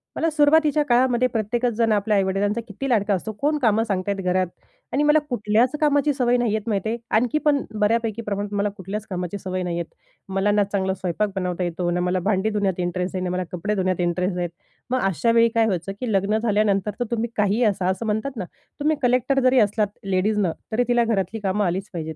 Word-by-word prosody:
मला 330 - +1
सुरुवातीच्या 300 0 +4
काळामध्ये 250 -1 +3
प्रत्येकच 235 +1 -1
जण 225 0 +1
आपल्या 210 0 +2
आई-वडिलांचा 200 +3 0
किती 270 +7 -5
लाडका 210 -4 +2
असतो. 195 +3 -2
कोण 300 +1 +2
कामं 225 -3 +3
सांगत 195 -3 -2
आहेत 200 -1 -1
घरात? 185 0 +1 0.5
आणि 285 - +2
मला 300 +1 +5
कुठल्याच 230 +1 +2
कामाची 290 -1 +3
सवय 245 -2 +2
नाहीये 220 -3 +1
माहिती 205 -1 -1
आहे. 230 - -1 0.2
आणखी 250 +6 +1
पण 285 -2 +3 0.2
बऱ्यापैकी 225 +1 +1
प्रमाणात 205 -1 -4
मला 205 +1 +1
कुठल्याच 195 +3 -5
कामाची 180 +1 -3
सवय 185 -1 -4
नाहीये. 170 -1 -2 0.5
मला 195 +2 +1
ना 205 0 +3
चांगला 195 -1 -1
स्वयंपाक 190 +2 -2
बनवता 180 -1 -2
येतो, 175 0 -2
ना 175 - 0
मला 180 +1 0
भांडी 210 +1 +1
धुण्यात 200 -4 -1
इंटरेस्ट 180 +1 -2
आहे, 185 - -2
ना 180 - -2
मला 185 0 -1
कपडे 200 +4 -2
धुण्यात 185 -2 0
इंटरेस्ट 180 +1 0
आहे. 175 -1 -1 0.4
मग 255 +1 +1
अशा 210 +5 +1
वेळी 230 0 +5
काय 225 -1 +4
व्हायचं, 190 -3 -2
की 245 -3 -2
लग्न 200 +2 +2
झाल्यानंतर 210 -2 +1
तर 245 - 0
तुम्ही 235 0 -1
काहीही 210 +3 +2
असा, 195 -4 +1
असं 190 +5 -2
म्हणतात 220 +5 -1
ना, 185 - -3 0.3
तुम्ही 305 +2 +2
कलेक्टर 255 +2 +2
जरी 255 0 +5
असलात 210 0 +2 0.2
लेडीजनं, 195 0 +1 0.2
तरी 245 +3 +2
तिला 240 -1 +3
घरातली 215 -1 -1
कामं 200 +1 +1
आलीच 190 +3 -2
पाहिजेत. 160 -2 -5
210 Hz, 205 wpm, -23 LUFS, 190-235 Hz, 0.5 s, मला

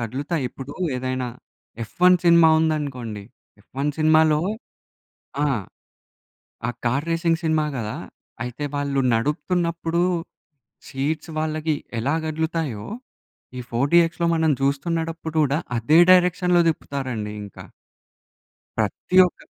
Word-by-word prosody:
కదులుతాయి. 140 +7 -3
ఇప్పుడు 135 +2 -9 0.2
ఏదైనా 130 0 -2 0.5
'ఎఫ్ 110 - -10
1' 180 0 +6
సినిమా 170 -1 +7
ఉందనుకోండి, 140 -9 -2 0.4
'ఎఫ్ 105 - -26
1' 145 +1 0
సినిమాలో 155 -1 +4 1.0
ఆ! - - +2 1.2
ఆ - - +1
కార్ 135 +6 0
రేసింగ్ 165 0 +1
సినిమా 155 -1 +2
కదా! 110 -3 -4 0.5
అయితే 125 +4 -5
వాళ్ళు 140 -1 0
నడుపుతున్నప్పుడు 170 +6 0 0.9
సీట్స్ 150 +4 -3
వాళ్ళకి 155 0 -1 0.2
ఎలా 135 +7 0
కదులుతాయో, 155 -8 -2 0.7
ఈ - - -4
ఫోర్ 125 +4 0
డీఎక్స్‌‌లో 170 0 +4
మనం 160 -1 +2
చూస్తున్నడప్పుడు 160 +3 -2
కూడా 145 +1 +1 0.2
అదే 150 +9 +4
డైరెక్షన్‌లో 180 -1 +4
తిప్పుతారండి 130 -9 -4
ఇంకా. 100 - -11 1.1
ప్రతి 185 - -1
ఒక్క 180 - -9
155 Hz, 105 wpm, -23 LUFS, 130-165 Hz, 1.2 s, సినిమా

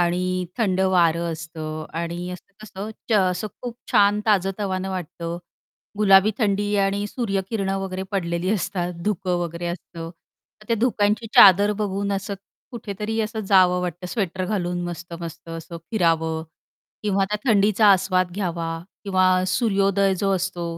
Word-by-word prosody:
आणि 180 +1 0
थंड 190 -4 +1
वार 175 -3 +3
असतं 160 -2 -5 0.2
आणि 175 +1 -4
असं-कसं 200 +3 -9 0.2
च - - +3 0.2
असं 180 +4 -3 0.2
खूप 245 -2 -5 0.2
छान 205 +1 +4
ताजं-तवानं 195 -1 0
वाटतं. 170 -2 -5 0.6
गुलाबी 195 0 +6
थंडी 205 -2 +1
आणि 200 +1 -1
सूर्यकिरणं 195 -3 -2
वगैरे 190 -1 -4
पडलेली 170 -1 -1
असतात 185 -3 -1 0.2
धुकं 185 -3 -1
वगैरे 170 0 -4
असतं. 170 -1 -6 0.5
तर - - -15
त्या 230 - +2
धुक्यांची 220 -2 +1
चादर 200 +2 +8
बघून 200 0 -1
असं 200 +1 -3 0.4
कुठेतरी 220 -1 -4
असं 220 0 -3
जावं 180 -2 +5
वाटतं 180 0 -4
स्वेटर 185 0 -2
घालून 180 -3 -2
मस्त-मस्त 170 -1 -7
असं 165 +1 -7
फिरावं 165 -5 +1 0.6
किंवा 200 -2 +1
त्या 210 - 0
थंडीचा 210 0 +4
आस्वाद 185 -1 +1
घ्यावा 170 -4 -3 0.3
किंवा 185 -2 +3 0.2
सूर्योदय 195 -1 +2
जो 195 +2 0
असतो 180 -1 -2
190 Hz, 135 wpm, -23 LUFS, 175-205 Hz, 0.6 s, चादर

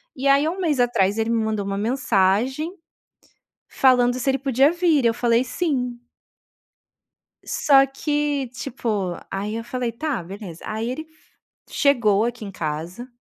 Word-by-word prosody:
E 275 +1 -2
aí, 280 +2 +4
1 365 +4 -3
mês 305 -7 0
atrás 220 -4 +2
ele 225 +1 0
me 225 -1 +1
mandou 215 -2 -2
uma 195 0 -3
mensagem, 240 - +1 1.0
falando 250 -2 +4
se 270 - 0
ele 270 - +2
podia 270 +2 +3
vir 335 -7 +2
e - - +7
eu 230 - +2
falei: 235 +1 +2
"Sim". 255 -4 -2 1.5
Só 275 -2 +4
que, 290 0 -1
tipo, 220 -8 -3 0.2
aí 205 +3 -3
eu 230 - -4
falei: 245 -1 -3
"Tá, 265 - -3
beleza". 190 -2 -9
Aí, 220 +3 -3
ele 315 +4 -5 0.6
chegou 235 -7 +3
aqui 240 -1 -4
em 195 - -7
casa, 170 +8 -5
245 Hz, 150 wpm, -22 LUFS, 215-275 Hz, 1.5 s, e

